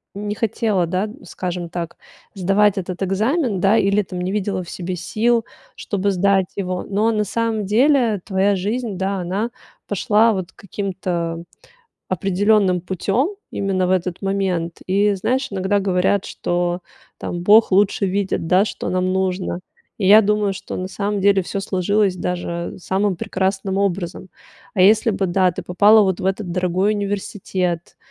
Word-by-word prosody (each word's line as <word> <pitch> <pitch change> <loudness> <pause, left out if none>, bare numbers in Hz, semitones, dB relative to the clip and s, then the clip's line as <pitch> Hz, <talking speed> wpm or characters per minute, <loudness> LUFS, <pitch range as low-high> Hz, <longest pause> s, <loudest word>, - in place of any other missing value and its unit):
не 205 +1 -3
хотела, 215 -4 0
да, 185 +4 -1
скажем 180 -1 -4
так, 170 -1 -5 0.4
сдавать 200 +2 +2
этот 185 0 -3
экзамен, 215 - 0
да, 195 +4 +4
или 200 0 +3
там 185 -2 -7
не 185 +1 -2
видела 195 -2 -2
в 175 - -11
себе 180 0 -4
сил, 230 +6 0 0.3
чтобы 200 0 -1
сдать 195 0 +2
его. 185 -2 -3
Но 210 +3 +1
на 210 -1 0
самом 220 0 -1
деле 235 -1 +3
твоя 195 +1 +2
жизнь, 210 +2 -2
да, 195 +1 -1
она 195 +7 -2 0.4
пошла 210 +3 +3
вот 185 -3 -4
каким-то 180 -4 -4 0.7
определённым 195 0 +2
путем 195 - 0 0.2
именно 190 -2 0
в - - 0
этот 180 0 -1
момент. 190 -4 -1
И 200 +2 +2
знаешь, 260 +7 -1
иногда 195 +1 0
говорят, 190 +1 +1
что 175 0 -2 0.4
там 175 - -4
Бог 210 +2 +5
лучше 200 0 +3
видит, 190 -3 -1
да, 185 +4 +4
что - - -5
нам 185 0 0
нужно. 185 -1 -1 0.4
И 190 - 0
я 210 +3 +9
думаю, 210 -1 +1
что 190 - -7
на 185 - -3
самом 205 +1 -2
деле 195 -1 +4
всё 195 - -4
сложилось 195 +1 +1
даже 175 -1 -4
самым 190 +1 0
прекрасным 190 +2 -2
образом. 190 -2 -2 0.5
А 185 - 0
если 215 +4 +5
бы, 195 -2 -1
да, 185 +1 +2
ты 170 - -6
попала 210 +4 +5
вот 190 -3 0
в - - -5
этот 190 -1 -2
дорогой 185 +3 +1
университет, 195 -4 -3
195 Hz, 155 wpm, -20 LUFS, 185-205 Hz, 0.7 s, я